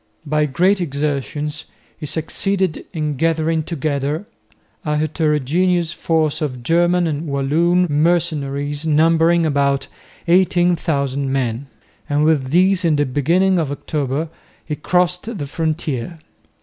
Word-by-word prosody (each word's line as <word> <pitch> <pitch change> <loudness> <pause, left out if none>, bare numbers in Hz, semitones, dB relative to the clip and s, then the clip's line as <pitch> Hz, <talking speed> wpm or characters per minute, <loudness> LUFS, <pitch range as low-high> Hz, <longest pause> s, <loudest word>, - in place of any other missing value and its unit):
By 150 0 +1
great 180 +8 +2
exertions 150 0 -3 0.3
he 150 - -7
succeeded 185 +4 -1
in 150 -3 -3
gathering 160 0 +1
together 150 +1 -2 0.6
a 150 -3 0
heterogeneous 160 +3 +1
force 160 -3 0
of 130 -5 -3
German 175 +4 +2
and 155 0 -2
Walloon 160 +6 +2
mercenaries 145 -2 0
numbering 165 +2 +3
about 140 -2 +1 0.4
18,000 165 -6 +1
men, 130 0 -2 0.4
and 145 +1 +2
with 150 -4 +2
these 185 +4 +3
in 165 -3 +3
the 145 0 +2
beginning 170 +8 +2
of 150 -4 -1
October 145 +1 -2 0.4
he 150 - -3
crossed 180 +7 0
the 145 - -4
frontier. 155 -1 -3
155 Hz, 115 wpm, -19 LUFS, 145-170 Hz, 0.6 s, numbering